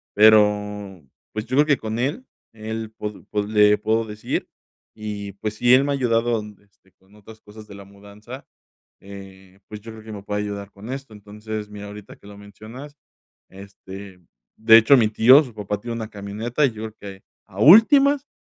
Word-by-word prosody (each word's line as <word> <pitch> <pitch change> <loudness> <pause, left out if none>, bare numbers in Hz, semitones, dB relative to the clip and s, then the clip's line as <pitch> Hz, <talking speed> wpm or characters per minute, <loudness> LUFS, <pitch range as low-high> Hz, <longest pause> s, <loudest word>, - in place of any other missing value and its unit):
pero, 105 -3 +3 0.3
pues, 110 0 -4
yo 130 - -3
creo 150 - +5
que 145 -3 +3
con 110 0 -5
él, 150 - -3 0.3
él 110 0 -6
pod 105 -1 -7
pod 105 -1 -2
le 105 -1 +4
puedo 110 +1 -1
decir. 105 0 -5 0.5
Y, 105 -2 -7
pues, 105 +2 -5
sí, 120 +3 +3
él 130 +2 +6
me 145 - -1
ha - - 0
ayudado, 115 -3 0 0.2
este, 100 -2 -33
con 95 +2 -26
otras 110 +1 -16
cosas 105 +1 -14
de 100 - -12
la 100 0 -12
mudanza, 105 +6 -13 0.6
eh, 95 -1 -13
pues, 105 -1 -10
yo 115 +2 -10
creo 110 -1 -13
que 110 - -10
me 100 - -8
puede 105 0 -3
ayudar 100 -1 -6
con 105 +5 -10
esto. 135 -4 -8
Entonces, 105 +1 -8
mira, 105 0 -9
ahorita 105 0 -12
que - - -18
lo 100 0 -13
mencionas, 110 +8 -12 0.5
este, 95 -1 -12 0.4
de 110 +1 +7
hecho, 115 +5 +6
mi 115 -3 +3
tío, 125 +6 +6
su 125 -5 -12
papá, 105 -1 -4
tiene 120 0 -5
una 110 -2 -6
camioneta, 110 +7 -2
y 135 - 0
yo 110 -1 -9
creo 110 -1 -8
que 100 -1 -11 0.2
a 100 -1 -12
últimas, 275 - +6
105 Hz, 190 wpm, -22 LUFS, 100-115 Hz, 0.6 s, de